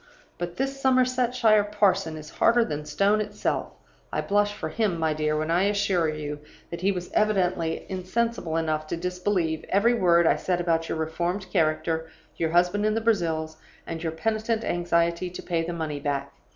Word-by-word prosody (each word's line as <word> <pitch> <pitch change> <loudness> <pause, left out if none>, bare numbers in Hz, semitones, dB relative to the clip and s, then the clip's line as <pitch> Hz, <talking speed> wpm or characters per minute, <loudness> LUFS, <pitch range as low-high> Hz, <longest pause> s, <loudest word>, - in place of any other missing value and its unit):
But 175 0 -4
this 275 +1 -2
Somersetshire 250 -4 +3
parson 195 -5 +1
is 155 0 -10
harder 235 0 +3
than 150 -3 -4
stone 200 +8 +2
itself. 210 -1 -2 0.4
I - - -1
blush 205 0 +2
for 205 -6 -5
him, 205 0 0
my 160 -1 +1
dear, 155 0 0
when 155 +1 -1
I 180 +3 +3
assure 200 -5 +1
you 150 -1 -4 0.3
that 170 - -5
he 195 +2 +3
was 180 -2 -5
evidently 180 -6 +1
insensible 185 -2 -2
enough 155 -1 -1
to 170 - -3
disbelieve 180 -2 -1
every 215 +5 +3
word 170 -6 +4
I - - +4
said 180 -1 -1
about 165 -2 0
your - - -2
reformed 170 +5 -2
character, 160 +1 0 0.3
your 165 - -1
husband 175 +4 +2
in 215 0 +2
the - - +2
Brazils, 165 -8 0 0.3
and 165 -1 -5
your 160 -2 -2
penitent 220 +5 -1
anxiety 170 0 0
to 180 - -8
pay 170 -2 0
the 170 - -3
money 160 -4 -3
back. 140 -1 -2
175 Hz, 180 wpm, -26 LUFS, 160-205 Hz, 0.4 s, word